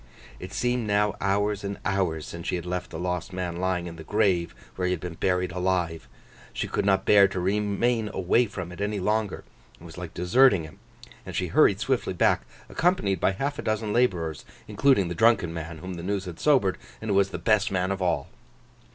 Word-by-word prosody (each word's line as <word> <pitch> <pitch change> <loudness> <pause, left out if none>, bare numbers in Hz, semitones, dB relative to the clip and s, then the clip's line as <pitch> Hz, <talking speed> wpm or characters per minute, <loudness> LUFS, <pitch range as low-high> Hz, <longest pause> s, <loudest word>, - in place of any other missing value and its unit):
It 90 - -8
seemed 120 +2 -1
now 105 0 +2
hours 100 +1 0
and 100 0 -4
hours 90 -6 0
since 85 0 -8
she - - 0
had 90 - -5
left 90 +1 -3
the 80 - -7
lost 90 +2 -3
man 90 -2 -3
lying 90 -1 -1
in 85 -1 -8
the 80 - -9
grave 95 -4 +1 0.2
where 90 -1 -1
he 90 - +1
had 90 - -3
been 90 0 -6
buried 90 +2 0
alive. 90 -3 -1 0.5
She - - -2
could - - -1
not 95 -1 +2
bear 100 -1 +7
to 95 -1 -4
remain 105 +4 0
away 100 +7 +2
from 95 -4 -6
it 90 - -9
any 105 0 -1
longer—it 105 -4 -4
was 85 0 -10
like 90 -3 -8
deserting 95 +1 +4
him—and 80 - -13
she - - -1
hurried - - +4
swiftly - - 0
back, - - +2 0.2
accompanied 160 - +1
by 95 - +2
half 140 +8 -3
a - - -1
dozen 110 -2 -1
labourers, 85 - 0 0.2
including 130 -10 +3
the 85 - -3
drunken 110 -5 +3
man 80 0 -6
whom 90 +4 -7
the 85 - -6
news 100 +2 -2
had 85 -2 -8
sobered, 130 -11 +3 0.2
and 110 -1 -3
who - - +2
was 100 0 +3
the - - -5
best 110 -2 +2
man 95 0 0
of 95 0 -3
all. 90 -2 0
95 Hz, 205 wpm, -26 LUFS, 90-105 Hz, 0.5 s, bear